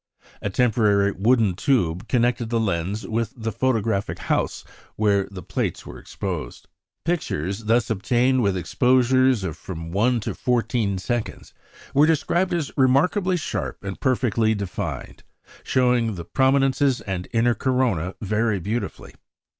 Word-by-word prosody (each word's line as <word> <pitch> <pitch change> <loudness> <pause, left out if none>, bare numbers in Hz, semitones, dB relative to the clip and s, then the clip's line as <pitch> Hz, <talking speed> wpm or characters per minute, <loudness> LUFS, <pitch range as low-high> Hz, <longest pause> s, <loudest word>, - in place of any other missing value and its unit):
A 105 - -2
temporary 105 -3 +2
wooden 110 0 +2
tube 90 - 0
connected 120 -2 +1
the 115 -1 +1
lens 95 0 -2
with 115 +1 -2
the 115 -1 -3
photographic 110 -3 0
house - - -1 0.3
where 100 -2 +2
the 95 -3 -9
plates - - -3
were - - -9
exposed. 85 -10 -6 0.4
Pictures 105 - -2
thus 115 +2 +2
obtained 125 +5 +2
with 100 -4 +1
exposures 130 +4 +3
of 85 -5 -3
from 85 -1 -7
one 115 +6 +2
to - - -3
fourteen 115 -4 0
seconds, 120 +4 -4 0.4
were 145 +3 +5
described 170 +3 +1
as 170 -5 -1
"remarkably 180 +8 +3
sharp 155 - -4
and 100 -1 -5
perfectly 115 -4 +1
defined, 100 -3 -5 0.4
showing 125 -4 +1
the 85 -2 -7
prominences 135 +2 +2
and 95 -2 -4
inner 120 +1 +3
corona 115 - 0
very 110 +1 0
beautifully. 110 +7 -4
115 Hz, 130 wpm, -23 LUFS, 100-130 Hz, 0.4 s, were